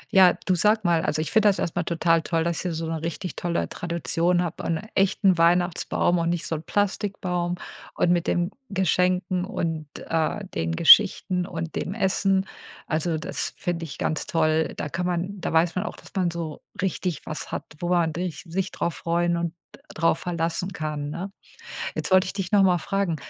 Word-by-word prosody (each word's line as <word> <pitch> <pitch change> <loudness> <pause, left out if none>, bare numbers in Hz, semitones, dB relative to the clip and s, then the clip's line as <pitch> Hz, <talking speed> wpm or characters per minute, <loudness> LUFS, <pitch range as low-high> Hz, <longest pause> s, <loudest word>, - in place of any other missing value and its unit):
Ja, 185 -2 +8
du 185 - +3
sage 210 +5 +3
mal, 170 -2 +3
also, 155 -3 0
ich - - -5
finde 220 -2 +5
das 195 - +1
erstmal 175 0 -1
total 165 -1 +2
toll, 165 0 0
dass 170 0 -1
ihr 180 - -1
so 165 0 -3
'ne 160 -1 -3
richtig 170 +2 -4
tolle 170 -1 -1
Tradition 175 +1 0
habt 170 - -4
und 165 -1 -1
echten 190 -2 +3
Weihnachtsbaum 175 0 +2
und 170 0 0
nicht 170 -1 -1
so - - -3
'n 155 - -2
Plastikbaum 185 -3 -1 0.4
und 175 - +2
mit 175 -1 +1
dem 175 +2 +1 0.2
Geschenken 180 -1 +1
und, 165 -4 -3 0.2
äh, 165 +5 0
den 80 0 -1
Geschichten 180 - +6
und 165 -1 -5
dem 190 - -3
Essen. 190 -2 +2 0.4
Also, 160 +1 -1
das 165 +5 -3
finde 170 -1 -2
ich 150 - -8
ganz 155 - -2
toll. 160 -1 +1
Da - - -3
kann 180 +4 -2
man 180 +3 -2
da - - -2
weiß 165 +1 +3
man 185 - 0
auch, - - -5
dass - - -15
man 185 -3 +2
so 165 -3 -5 0.2
richtig 180 -2 -2
was 155 - -6
hat, - - -3 0.2
wo 175 - -2
man 170 -3 +2
rich 175 0 -4
sich 190 +3 -2
drauf 170 - -2
freuen 170 0 0
und 170 -1 -2 0.4
drauf 165 0 +2
verlassen 170 +2 -2
kann, 150 -3 -4
ne? 175 +6 -5 0.6
Jetzt - - -3
wollte 185 0 +6
ich - - -4
dich 195 -2 -4
noch 205 -2 +5
mal 180 -2 +4
fragen, 195 -1 -1
175 Hz, 195 wpm, -25 LUFS, 165-185 Hz, 0.6 s, Ja